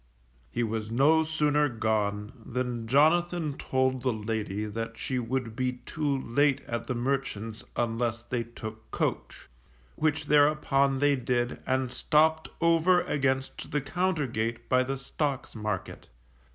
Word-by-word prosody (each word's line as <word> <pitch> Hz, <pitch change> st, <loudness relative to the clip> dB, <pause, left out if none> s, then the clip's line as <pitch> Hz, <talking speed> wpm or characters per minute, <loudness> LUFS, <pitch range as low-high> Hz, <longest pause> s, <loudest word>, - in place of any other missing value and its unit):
He 120 Hz, -, -1 dB
was 110 Hz, -1 st, -2 dB
no 145 Hz, +7 st, +4 dB
sooner 150 Hz, -2 st, +2 dB
gone 105 Hz, -3 st, -1 dB
than 120 Hz, -1 st, -3 dB
Jonathan 160 Hz, +3 st, +3 dB
told 130 Hz, -1 st, 0 dB
the 130 Hz, 0 st, +1 dB
lady 110 Hz, -2 st, -3 dB
that 115 Hz, +2 st, -5 dB
she 130 Hz, -1 st, -2 dB
would 120 Hz, -1 st, -2 dB
be 130 Hz, 0 st, 0 dB
too 145 Hz, -3 st, -1 dB
late 140 Hz, +3 st, +2 dB
at 115 Hz, 0 st, -4 dB
the 130 Hz, -, -1 dB
merchant's 120 Hz, -4 st, -2 dB
unless 115 Hz, -1 st, -1 dB
they 120 Hz, -1 st, -2 dB
took 110 Hz, -2 st, -9 dB
coach; -, -, -3 dB, 0.5 s
which 155 Hz, -1 st, 0 dB
thereupon 145 Hz, -2 st, +3 dB
they 145 Hz, +1 st, +3 dB
did, 120 Hz, -1 st, -1 dB
and 130 Hz, -1 st, 0 dB
stopped 160 Hz, +3 st, +2 dB
over 170 Hz, +2 st, +4 dB
against 135 Hz, -2 st, -1 dB
the 145 Hz, -, 0 dB
Compter 175 Hz, +2 st, 0 dB
gate 115 Hz, -1 st, -3 dB
by 130 Hz, 0 st, +4 dB
the 135 Hz, +1 st, -2 dB
Stocks 135 Hz, 0 st, -3 dB
Market. 105 Hz, -4 st, -4 dB
130 Hz, 140 wpm, -28 LUFS, 115-145 Hz, 0.5 s, no